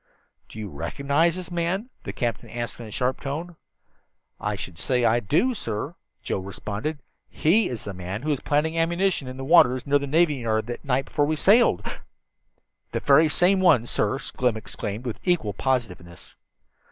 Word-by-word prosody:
"Do - - -12
you 110 -1 -5
recognize 140 - 0
this 185 -1 -6
man?" 180 +8 -1
the - - -3
captain 120 -4 -3
asked 120 0 -5
in 115 - -7
a - - -9
sharp 125 +4 -1
tone. 160 +5 -5 0.8
"I 105 0 -2
should 90 -4 -7
say 125 -2 +1
I 115 +1 +4
do, 155 - +1
sir," 115 - -4 0.3
Joe - - -2
responded. 105 +9 -4 0.3
"He 200 +8 +2
is 120 -3 -5
the 100 - -5
man 95 +5 -6
who 155 - 0
was 140 - 0
planting 150 +2 0
ammunition 170 -2 +1
in 130 0 -7
the 135 - -5
waters 130 -5 +5
near 145 0 +3
the 140 - -4
navy 155 0 +3
yard 110 -3 -1
that 120 0 -6
night 135 -1 0
before 145 - 0
we 155 +2 0
sailed!" 215 +9 +4 1.1
"The - - 0
very 160 0 +5
same 185 +5 +3
one, 160 -11 +5
sir!" 105 0 0
Slim 125 -4 -1
exclaimed, 105 +2 -5
with 120 - -4
equal 165 - +1
positiveness. 95 -11 -3
135 Hz, 175 wpm, -25 LUFS, 110-165 Hz, 1.1 s, waters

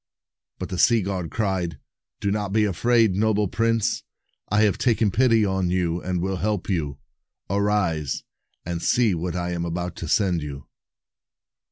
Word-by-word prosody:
But - - -5
the 90 - -4
sea 115 -4 +4
god 90 -3 -3
cried, 95 -7 -1 0.4
"Do 100 - 0
not 105 -1 -2
be 105 +1 +3
afraid, 110 +2 +3
noble 105 +1 +2
prince; 115 +2 0 0.5
I 105 +1 +3
have 105 -4 +2
taken 115 -4 +2
pity 115 -1 +4
on 95 -2 0
you 90 -1 0
and 90 -1 -2
will 95 +1 -1
help 105 -1 -1
you. 75 -7 -1 0.5
Arise, 100 -8 0 0.4
and 85 0 -3
see 115 0 +3
what 85 +1 -3
I 90 0 -2
am 85 -1 -2
about 85 +1 -3
to 85 - -5
send 90 0 +2
you." 70 -2 -7
95 Hz, 160 wpm, -24 LUFS, 85-105 Hz, 0.5 s, sea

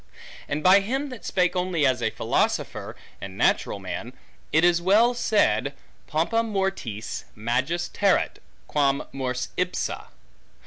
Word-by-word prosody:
And 150 +2 -2
by 185 +2 +7
him 265 +8 -2
that 250 -4 -9
spake 180 -1 +1
only 180 -4 +1
as 130 -3 +2
a 110 - +1
philosopher, 110 - -1 0.3
and 95 0 -7
natural - - +2
man, 100 +5 -6 0.4
it 160 - +3
was 175 -1 +4
well 215 +7 +4
said, 225 -3 +1 0.3
Pompa 230 0 +1
mortis 190 - -3
magis 130 +11 -1
terret, 200 -2 +1 0.3
quam 140 -2 +1
mors 125 -2 -3
ipsa. 180 0 -2
175 Hz, 130 wpm, -25 LUFS, 125-195 Hz, 0.4 s, by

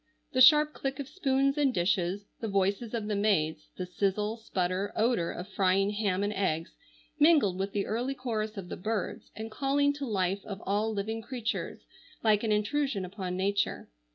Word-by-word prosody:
The 255 - +3
sharp 300 +3 +7
click 270 -1 -3
of 280 - -4
spoons 275 -4 +1
and 280 -2 +3
dishes, 185 0 0
the 225 - -3
voices 200 +3 0
of 220 -2 -2
the 210 - -1
maids, 160 -7 +1
the 185 - -3
sizzle, 200 +4 -1
sputter, 190 -2 -2
odor 225 -7 +2
of 180 - -6
frying 195 0 +2
ham 200 -2 0
and 205 +1 -1
eggs, 170 -5 -1 0.5
mingled 290 - +5
with 195 +1 -1
the 200 -1 -1
early 245 +5 -2
chorus 220 -4 -3
of 185 -2 -6
the - - -5
birds, 215 +1 -3
and 220 0 -6
calling 285 +4 +2
to 285 -1 -5
life 195 -2 0
of 200 -2 -6
all 210 +3 +1
living 220 +2 -3
creatures, 235 -2 -4 0.4
like 215 -1 +3
an 220 - 0
intrusion 210 0 0
upon 185 -1 -5
nature. 200 +2 0
210 Hz, 180 wpm, -29 LUFS, 190-245 Hz, 0.5 s, sharp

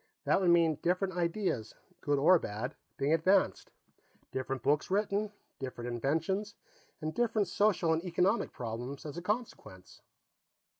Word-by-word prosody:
That - - +3
would 180 - +3
mean 165 -3 +4
different 185 +2 +1
ideas, 170 - -1 0.3
good 145 -1 +1
or 165 +6 +6
bad, 110 +2 -4 0.2
being 140 +3 +2
advanced; 185 +4 +2 0.6
different 130 0 -3
books 145 +2 +2
written; 205 +1 0 0.3
different 125 -2 -5
inventions, 165 - -1 0.5
and 155 0 -3
different 225 -4 +1
social 185 -4 +2
and 160 +1 -1
economic 180 +5 +1
problems 120 +4 -6
as 150 - -6
a 175 - -5
consequence." 195 - -5
165 Hz, 135 wpm, -32 LUFS, 135-195 Hz, 0.6 s, or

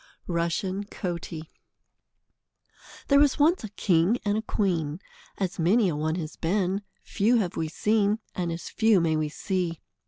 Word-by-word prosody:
Rushen 185 +3 -1
Coatie 170 -3 -5 1.6
There 280 -1 +5
was 285 -2 +4
once 315 +2 +3
a 215 - -5
king 190 +1 +2
and 205 0 +1
a 220 - 0
queen, 175 -8 -1 0.4
as 190 -1 -3
many 195 +5 +3
a 160 - -2
one 155 +2 -1
has 160 -3 -5
been; 190 +3 0 0.2
few 220 +5 +2
have 190 -6 -1
we 160 - -1
seen, 210 +5 +1 0.2
and 175 -2 -2
as 165 0 -5
few 220 -3 +3
may 165 -2 +1
we 155 -1 0
see. 175 0 -2
185 Hz, 155 wpm, -26 LUFS, 165-210 Hz, 1.6 s, There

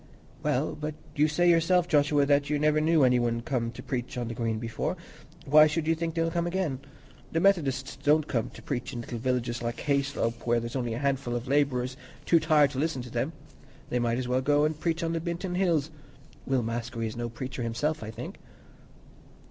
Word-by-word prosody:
"Well, 140 +5 0
but 150 0 -5 0.2
you 150 +1 +4
say 175 +4 +2
yourself, 175 +1 +4
Joshua, 145 -3 +3
that 145 0 +2
you 150 - +1
never 155 +1 +3
knew 160 -1 +4
any 125 -1 +4
one 115 -1 0
come 120 -3 -1
to - - -9
preach 125 -1 -4
on 120 -2 -2
the - - -3
Green 115 -1 -1
before; 115 0 -3 0.5
why 150 +2 +7
should 155 +1 -1
you 165 - +3
think 165 0 -3
they'll 165 0 +1
come 170 0 0
again? 175 -7 -1 0.5
The 165 - +1
Methodists 145 -8 +1
don't 150 +1 +2
come 115 -3 -1
to - - -12
preach 125 -4 -3
in 120 - -4
little 120 0 -6
villages 125 -1 -1
like 120 0 -3
Hayslope, 140 -5 -1
where 120 0 +3
there's 115 +2 -6
only 120 -3 -1
a - - -3
handful 135 -2 -1
of 120 +2 -4
labourers, 130 -2 +1 0.3
too 170 - +5
tired 155 -3 +4
to 135 - -4
listen 145 -4 -1
to 125 - -10
them. 130 +7 -1 0.6
They 125 - +1
might 120 -1 +1
almost 120 - 0
as 125 - -4
well 130 +1 +2
go 145 +2 +3
and 155 0 -1
preach 165 0 -1
on 165 0 -1
the 165 - 0
Binton 175 +2 -3
Hills. 165 -5 +1 0.6
Will 130 -2 +1
Maskery 115 0 -3
is 110 - -4
no 120 0 -3
preacher 125 +2 -6
himself, 145 +7 -1
I 110 - -6
think." 115 +3 -8
140 Hz, 215 wpm, -28 LUFS, 120-155 Hz, 0.6 s, why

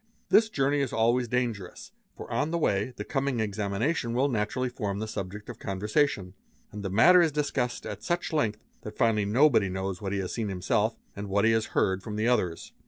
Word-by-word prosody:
This 220 0 +5
journey 145 -5 +1
is 135 - -1
always 120 +2 +2
dangerous, 115 -6 -3 0.3
for - - -8
on 150 - 0
the 170 - -1
way 130 -5 0
the 105 - -4
coming 135 +1 -1
examination 110 +5 -1
will 135 +3 +2
naturally 120 +2 -1
form 105 -5 -3
the 110 +1 -3
subject 100 0 -6
of - - -8
conversation; 105 0 0 0.4
and 105 - -7
the 95 - -2
matter 175 - +6
is 165 -2 +3
discussed 140 -4 -2
at - - -6
such 175 -1 -2
length 110 -9 0 0.2
that 105 0 -9
finally 110 -4 +2
nobody 115 -2 +4
knows 95 0 -4
what 100 -2 -3
he 100 - -1
has 95 -2 -3
seen 115 -3 -2
himself 105 +4 0 0.2
and 100 0 -6
what 100 +2 +2
he 115 - +5
has 115 -1 +1
heard 95 0 +2
from 105 +1 -6
the 110 +2 0
others. 90 -9 0
110 Hz, 205 wpm, -28 LUFS, 100-130 Hz, 0.4 s, matter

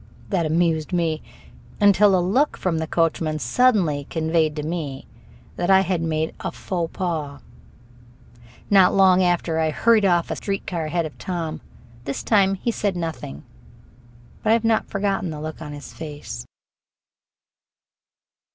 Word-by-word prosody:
That 175 -6 +1
amused 160 0 +1
me, 165 -3 0 0.6
until 205 -1 +5
a 175 - 0
look 270 +10 +2
from 170 -4 -1
the 160 - -3
coachman 160 -1 0
suddenly 155 - +2
conveyed 160 -1 +1
to 150 - -4
me 150 -4 -4 0.5
that 175 - -1
I 190 0 +7
had 180 -3 -1
made 160 -1 -1
a - - -4
faux 175 -3 -3
pas. 155 -6 -3 1.3
Not 190 -2 +6
long 190 -1 +5
after 175 -2 +1
I 160 -1 +2
hurried 225 +7 +3
off 175 -3 +2
a - - -1
street 195 -1 -3
car 170 -3 -3
ahead 165 +2 -1
of 155 - -9
Tom. 170 -4 -4 0.4
This 140 - -4
time 195 -3 +3
he 235 +5 -2
said 205 -4 -1
nothing, 160 - -5 1.0
but 215 - -1
I - - +6
have 230 0 +1
not 225 -1 +1
forgotten 195 -2 -1
the 155 -2 -6
look 155 +1 -6
on 150 -2 -7
his 145 0 -9
face. 145 - -7
170 Hz, 150 wpm, -23 LUFS, 155-195 Hz, 1.3 s, I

